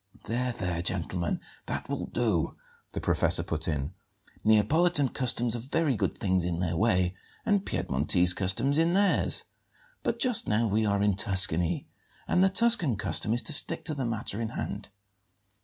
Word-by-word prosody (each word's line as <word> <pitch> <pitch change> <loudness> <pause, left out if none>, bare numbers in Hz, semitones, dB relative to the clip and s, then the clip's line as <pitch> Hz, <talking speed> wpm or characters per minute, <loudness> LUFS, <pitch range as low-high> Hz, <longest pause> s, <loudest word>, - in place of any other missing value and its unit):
"There, 120 +4 -2
there, 90 -6 -3
gentlemen, 85 0 -3 0.3
that - - -5
will - - -4
do!" 110 -9 -1 0.4
the - - -3
professor - - +2
put - - -2
in. 75 +1 -3 0.5
"Neapolitan 145 +8 +3
customs 120 -3 +1
are - - -4
very 140 +3 -1
good - - -2
things 95 -3 0
in 85 -1 -3
their 85 -2 -2
way 90 -3 +1 0.3
and 205 -2 0
Piedmontese 90 +2 +2
customs 105 - 0
in 165 +1 +2
theirs; 200 0 +2 0.6
but - - -2
just 250 -4 +2
now 110 +2 +1
we 110 0 0
are 100 0 0
in 105 -2 +1
Tuscany, 95 -4 +2 0.4
and 180 - +2
the 190 - +4
Tuscan 190 - +2
custom 105 +1 0
is 120 +2 +1
to 155 - 0
stick 165 +3 +4
to 160 - -1
the 135 -4 -3
matter 115 -1 -4
in 115 - -3
hand. 105 -2 -6
110 Hz, 165 wpm, -27 LUFS, 90-140 Hz, 0.6 s, the